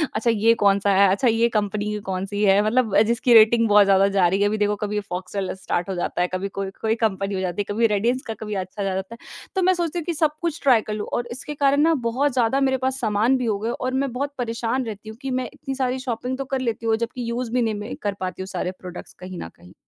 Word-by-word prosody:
अच्छा 235 +1 +1
ये 225 +1 +4
कौन-सा 200 0 +3
है, 200 0 +6
अच्छा 200 +6 +1
ये 230 +1 +3
कंपनी 210 -1 -1
कौन 190 0 -2
सी 205 +1 -4
है। 195 0 +5
मतलब 225 -2 +2
जिसकी 235 +1 +2
रेटिंग 225 +1 +6
बहुत 205 0 +6
ज़्यादा 195 0 +4
जा 180 -2 +5
रही 195 +3 0
है। 205 - +4
अभी 215 +1 -1
देखो 210 0 +1
कभी 210 0 -2
फॉक्ससेल 185 +2 -3
स्टार्ट 175 +2 -2
हो 190 - -2
जाता 175 0 -2
है, 180 - +2
कभी 185 +2 -2
कोई-कोई 195 +3 -2
कंपनी 195 -1 -2
हो - - -2
जाती 185 +2 -2
है, 205 0 -4
कभी 230 +1 +3
रेडियंस 230 +5 0
का 225 - -3
कभी 210 -1 -5
अच्छा 190 +2 -5
आ - - -1
जाता 190 +4 -4
है। - - -17 0.4
तो 380 - +1
मैं 370 +1 +4
सोचती 345 -1 -2
हूँ - - -5
कि 345 - -1
सब 310 -1 +2
कुछ 340 -1 -2
ट्राई 250 -5 +5
कर 210 - -2
लूँ, 210 -1 -4
और 240 0 -1
इसके 270 +4 -5
कारण 280 0 +3
ना 325 +1 +4 0.2
बहुत 270 +3 0
ज़्यादा 250 +1 +2
मेरे 265 -1 +2
पास 260 +1 0
सामान 220 +4 +2
भी 250 - -2
हो 210 -3 0
गए 225 - -2
और 255 +1 -3
मैं 275 - -3
बहुत 280 +3 -3
परेशान 235 +1 -2
रहती 215 0 -7
हूँ 220 - -10
कि 270 -1 -4
मैं 255 -2 -2
इतनी 270 0 -6
सारी 260 -1 -1
शॉपिंग 250 0 -3
तो 275 - -4
कर 265 - +1
लेती 230 -2 -3
हूँ 225 -1 +3
जबकि 235 +1 -4
यूज़ 235 0 -3
भी 250 - +1
नहीं 225 -2 0
मैं 210 +3 -6
कर 205 -1 -1
पाती 185 0 -4
हूँ 190 - -5
सारे 185 -1 -3
प्रोडक्ट्स 180 -1 -9
कहीं 185 -1 -8
ना 80 - -6
कहीं। 90 +1 -17
225 Hz, 270 wpm, -23 LUFS, 200-255 Hz, 0.4 s, है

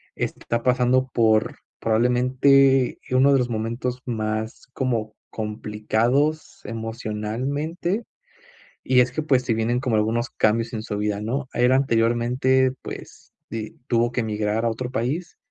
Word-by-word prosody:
está 115 0 -3
pasando 125 +1 +2
por 110 -2 +2 0.2
probablemente 130 +3 +3
uno 130 +2 +5
de 135 - +4
los 125 - -1
momentos 120 +3 -3
más 110 -2 -3
como 115 -5 -2 0.2
complicados 110 +7 -1
emocionalmente. 120 - -3 0.8
Y 130 -1 +4
es 125 0 +2
que, 155 - -2
pues, 135 -4 +2
se 120 - 0
vienen 115 +2 0
como 125 -4 0
algunos 115 +3 0
cambios 115 +2 +1
en 110 -2 -4
su 105 -2 -4
vida, 105 0 -1
¿no? 125 +6 -2
El 125 +1 +3
anteriormente, 125 +1 +2
pues, - - -10 0.2
di 110 +6 -6
tuvo 120 0 +1
que 120 - 0
migrar 105 0 -1
a 115 - +2
otro 125 +3 -4
país. 140 +10 -3
120 Hz, 135 wpm, -23 LUFS, 110-130 Hz, 0.8 s, uno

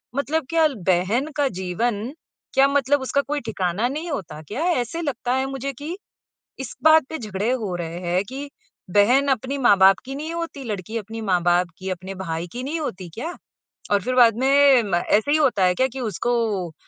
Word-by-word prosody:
मतलब 285 +1 -1
क्या 325 -1 +3
ल 280 - -6
बहन 190 - +2
का 285 - +3
जीवन 210 +5 -2 0.4
क्या 270 +1 +5
मतलब 280 0 +2
उसका 280 +2 +1
कोई 295 +1 -3
ठिकाना 205 -1 -1
नहीं 315 +5 -4
होता 185 - -5
क्या? 235 - -4
ऐसे 335 -1 0
लगता 250 -3 -2
है 265 0 0
मुझे 270 +1 -4
कि, 310 +8 -6 0.6
इस 265 - -6
बात 315 -2 +7
पे 320 - -4
झगड़े 210 -1 -2
हो 220 -8 -2
रहे 170 0 -5
हैं 180 +1 0
कि 280 +2 -6 0.4
बहन 245 +9 +4
अपनी 265 +2 0
माँ-बाप 195 -6 +6
की 270 - -6
नहीं 310 +4 -5
होती, 335 -5 -5
लड़की 215 -1 -5
अपनी 225 +2 -7
माँ-बाप 175 0 +2
की 190 - -6
अपने 185 +1 -5
भाई 170 -2 -4
की 250 - -5
नहीं 310 +5 -3
होती 190 - -5
क्या? 325 +9 -5 0.6
और 205 -1 +3
फ़िर 255 +5 -2
बाद 230 -3 +6
में 275 -1 +5
म 195 -4 -1
ऐसे 215 +10 +1
ही 310 - +4
होता 260 -10 +2
है 180 - +3
क्या 260 +5 +2
कि 265 +1 -8
उसको 215 -5 -1
245 Hz, 195 wpm, -23 LUFS, 190-280 Hz, 0.6 s, बात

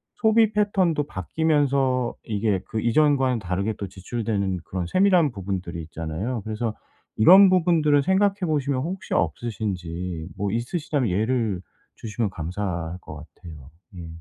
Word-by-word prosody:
소비 220 -1 +3
패턴도 190 -7 +1
바뀌면서 135 - 0
이게 105 -3 -1
그 110 - -2
이전과는 130 0 +2
다르게 100 +2 -2
또 100 - -5
지출되는 100 -1 -3
그런 90 -2 -4
세밀한 180 - +3
부분들이 95 -4 -5
있잖아요. 85 +9 -4
그래서 110 +1 -2 0.4
이런 190 - +8
부분들을 165 -5 +3
생각해 195 +4 +2
보시면 140 -4 0
혹시 180 +6 -5
없으신지 90 -2 -3
뭐 100 0 -1
있으시다면 135 - -1
예를 110 0 0 0.4
주시면 110 -1 -3
감사할 85 0 -4
것 75 - -9 0.2
같아요. 75 -6 -12 0.3
예. 85 -1 -7
115 Hz, 325 characters per minute, -24 LUFS, 90-150 Hz, 0.4 s, 이런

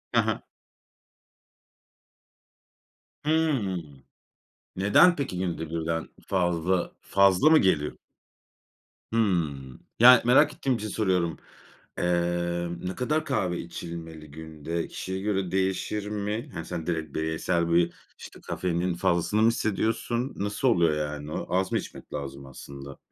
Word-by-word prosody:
Hı - - +6
hı. - - -1 2.8
Hıı. 145 - +1 0.9
Neden 105 - +5
peki 130 -11 -3
günde 85 -3 -3
1'den 80 0 -2 0.2
fazla, 90 -1 0
fazla 100 +8 +4
mı 160 - +7
geliyor? 75 -6 +1 1.2
Hımm. 80 - 0 0.2
Yani, 125 +1 +9
merak 145 +5 +5
ettiğim 135 -2 0
için 110 -2 -4
soruyorum. 90 -6 0 0.6
Eee, 85 0 0
ne 90 +1 -4
kadar 155 +5 0
kahve 90 -10 -1
içilmeli 80 -3 -8
günde? 80 +1 -5
Kişiye 95 0 -5
göre 95 -3 -1
değişir 95 +2 -1
mi? 105 +5 -3
Hani, - - -5
sen 85 -2 -5
direkt 80 -4 -2
bireysel 80 +2 0
bir 85 0 +3 0.2
işte - - -12
kafeinin 90 0 -1
fazlasını 85 +5 +1
mı 110 - +6
hissediyorsun? 115 +3 0
Nasıl 105 +6 -1
oluyor 85 -9 +3
yani 75 0 -4
o? - - -3
Az 95 0 +1
mı - - +2
içmek - - -8
lazım 70 -1 -6
aslında? 70 +1 -10
90 Hz, 120 wpm, -27 LUFS, 80-105 Hz, 2.8 s, Yani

